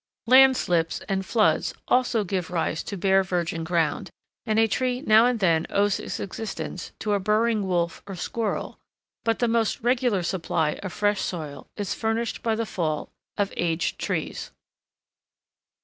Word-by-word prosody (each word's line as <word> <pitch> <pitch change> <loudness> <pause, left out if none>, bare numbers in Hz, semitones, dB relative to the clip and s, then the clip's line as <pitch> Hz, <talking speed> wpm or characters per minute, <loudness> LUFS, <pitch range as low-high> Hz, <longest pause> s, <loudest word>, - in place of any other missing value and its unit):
Land 260 +2 +7
slips 165 -2 0
and 195 -1 -2
floods 215 +2 +2
also 250 -3 +2
give 185 -2 -2
rise 165 -2 -1
to 200 - -5
bare 190 +1 +4
virgin 170 -3 -2
ground; 165 -2 0 0.4
and 215 0 +1
a 225 - +6
tree 250 +3 -1
now 225 -3 +6
and 245 -2 0
then 165 -4 +2
owes 200 0 +2
its - - -5
existence 195 -3 -5
to 210 -1 -1
a 200 - +2
burrowing 215 +1 +1
wolf 170 -2 -1
or 195 - -6
squirrel, 215 +5 -3 0.4
but 225 -1 +1
the 240 - +1
most 230 -1 +1
regular 240 -5 +1
supply 165 -4 -1
of 190 - -5
fresh 205 +1 +1
soil 150 -6 -5
is 205 -2 -2
furnished 225 +1 -2
by 225 -1 0
the 230 +1 -1
fall 160 -6 -2 0.3
of 200 -2 0
aged 170 -1 -1
trees. - - -3
200 Hz, 160 wpm, -25 LUFS, 175-225 Hz, 0.4 s, Land